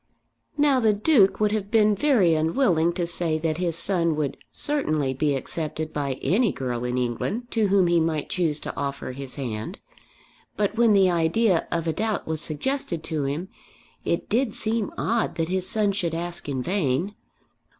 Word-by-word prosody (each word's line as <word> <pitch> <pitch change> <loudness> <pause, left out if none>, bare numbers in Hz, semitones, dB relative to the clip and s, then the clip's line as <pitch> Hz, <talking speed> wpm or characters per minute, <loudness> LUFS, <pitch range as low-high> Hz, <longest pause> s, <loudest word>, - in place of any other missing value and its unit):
Now 290 -3 +4
the 220 -3 +3
Duke 210 -2 +3
would 210 -1 +2
have 210 -2 -2
been 215 -1 +4
very 205 - +3
unwilling 165 - +2
to 175 -1 -1
say 170 -2 -1
that 160 -1 -1
his 175 -2 -1
son 170 -2 +1
would 150 -3 -2 0.2
certainly 155 - 0
be 145 +1 0
accepted 155 +3 -4
by 140 -2 -1
any 200 - +2
girl 125 -2 -3
in 125 0 -1
England 125 - -2
to 220 -3 +2
whom 195 -1 +4
he 170 -1 +3
might 160 -2 -1
choose 160 -5 0
to - - -6
offer 140 -2 -4
his 135 0 -7
hand. 115 -6 -5 0.8
But 205 +1 0
when 230 -2 +4
the 190 -2 +5
idea 170 +3 +2
of 170 -1 -1
a 160 - 0
doubt 215 +3 -2
was 160 -1 -2
suggested 170 - -2
to 155 -4 -2
him, 155 +7 -3 0.5
it - - -1
did 230 0 0
seem 220 -1 -2
odd 230 -1 0
that 165 0 -1
his 185 0 0
son 210 -2 +2
should 175 -4 -2
ask 170 -2 -4
in 130 -2 -2
vain. 175 +1 0
170 Hz, 180 wpm, -25 LUFS, 155-210 Hz, 0.8 s, the